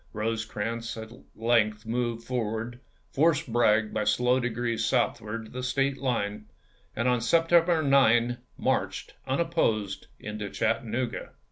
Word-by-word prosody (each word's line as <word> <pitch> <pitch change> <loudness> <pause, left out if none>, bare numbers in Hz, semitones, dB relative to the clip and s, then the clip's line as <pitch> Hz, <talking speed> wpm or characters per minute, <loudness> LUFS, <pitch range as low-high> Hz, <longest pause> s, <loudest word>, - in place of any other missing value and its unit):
Rosecrans 115 +1 -3
at 110 0 -8 0.2
length 110 -1 +1
moved 115 0 -2
forward, 120 0 -3 0.3
forced 145 -5 +2
Bragg 110 -2 +3
by 110 - 0
slow 125 +4 +3
degrees 120 -1 -1
southward 110 +1 0
to - - -14
the 125 - -5
State 135 +2 0
line, 105 -5 -2 0.5
and 115 +3 0
on 125 -2 +2
Sep 165 +8 +4
1863. 165 -1 +3
tember 120 -4 +5
9 120 0 -4 0.2
marched, - - -1
unopposed, 130 - 0
into 105 -1 -5
Chattanooga. 115 +3 -2
115 Hz, 130 wpm, -28 LUFS, 110-125 Hz, 0.5 s, tember